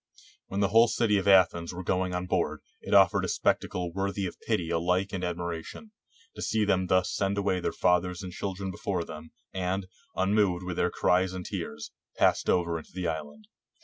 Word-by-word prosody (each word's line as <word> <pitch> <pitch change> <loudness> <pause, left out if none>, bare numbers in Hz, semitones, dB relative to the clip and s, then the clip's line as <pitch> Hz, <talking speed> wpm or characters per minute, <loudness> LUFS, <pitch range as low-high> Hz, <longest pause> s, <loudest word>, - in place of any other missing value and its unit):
When 100 +1 -2
the 100 - +2
whole 115 +3 +6
city 110 -3 +2
of 95 - -4
Athens 90 -3 +4
were 95 - -5
going 90 0 0
on 90 0 -2
board, - - -1 0.2
it - - -8
afforded - - +5
a - - -4
spectacle 90 -2 0
worthy 100 +1 -2
of 90 - -6
pity 90 -7 -1
alike 90 +4 0
and 95 -2 -3
admira 85 -1 -3
tion, 220 - -11 0.4
to - - -8
see 110 -1 +1
them 95 -2 +1
thus 95 0 +2
send 100 0 0
away 100 -2 +1
their - - -1
fathers 90 0 +1
and 90 -1 -7
chil 95 +1 -4
dren 95 0 -4
before 90 -1 -2
them, 80 0 -9 0.2
and, 95 +1 -2 0.3
unmoved 95 -2 +2
with 90 -1 -4
their 90 - +2
cries 90 +1 +1
and 90 -1 -6
tears, 75 0 -5 0.3
passed - - +3
over 85 -2 +1
into - - -15
the 90 -2 -2
island. 75 -3 -5
90 Hz, 200 wpm, -28 LUFS, 85-95 Hz, 0.4 s, whole